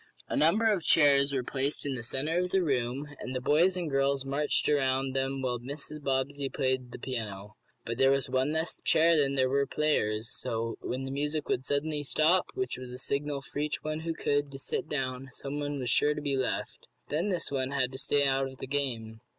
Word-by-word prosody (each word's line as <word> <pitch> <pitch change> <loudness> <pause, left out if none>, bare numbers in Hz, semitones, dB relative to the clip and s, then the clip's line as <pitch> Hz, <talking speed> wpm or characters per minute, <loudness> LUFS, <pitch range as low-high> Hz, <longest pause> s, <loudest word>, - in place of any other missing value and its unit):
A - - -1
number 195 +9 +4
of 210 -5 +3
chairs 140 -3 +5
were 135 -2 0
placed 135 +3 -1
in 140 - -1
the 125 - -3
centre 145 +8 -1
of 180 0 0
the 190 0 +2
room, 135 -1 0
and 130 - -5
the - - 0
boys 165 +8 +3
and 175 -2 -2
girls 135 -1 +1
marched 140 +2 +1
around 135 -2 +1
them 135 0 -1
while 125 -2 -1
Mrs. 145 +4 -7
Bobbsey 135 0 -1
played 130 -2 -1
the - - -7
piano. 105 -5 -5 0.3
But 115 +2 -4
there 135 0 +6
was 135 0 +2
one 130 +2 +1
less 160 +1 -1
chair 165 +1 +5
than 140 -3 +2
there 130 -1 +3
were 140 +1 +1
players, 115 -8 0
so 115 0 -3
that - - -6
when 130 +1 -2
the 135 - -4
music 150 +2 -2
would 130 - -1
suddenly 150 +1 0
stop, 155 +5 +3
which 385 0 -2
was 130 -1 -7
a 125 - -7
signal 140 +1 -2
for 145 - -6
each 150 0 -2
one 155 0 -2
who 165 0 -3
could, 145 -2 0
to 135 - -7
sit 140 - -3
down, 130 -2 -3
someone 145 +1 -4
was 125 -3 -1
sure 150 +5 +3
to - - -3
be 140 -2 0
left. 130 -1 -3 0.2
Then 165 +7 0
this 175 -6 -2
one 130 -2 0
had 130 -2 0
to 130 - -5
stay 140 +1 +2
out 135 0 +2
of 130 0 -11
the - - -5
game. 120 -6 -2
140 Hz, 225 wpm, -30 LUFS, 130-150 Hz, 0.3 s, there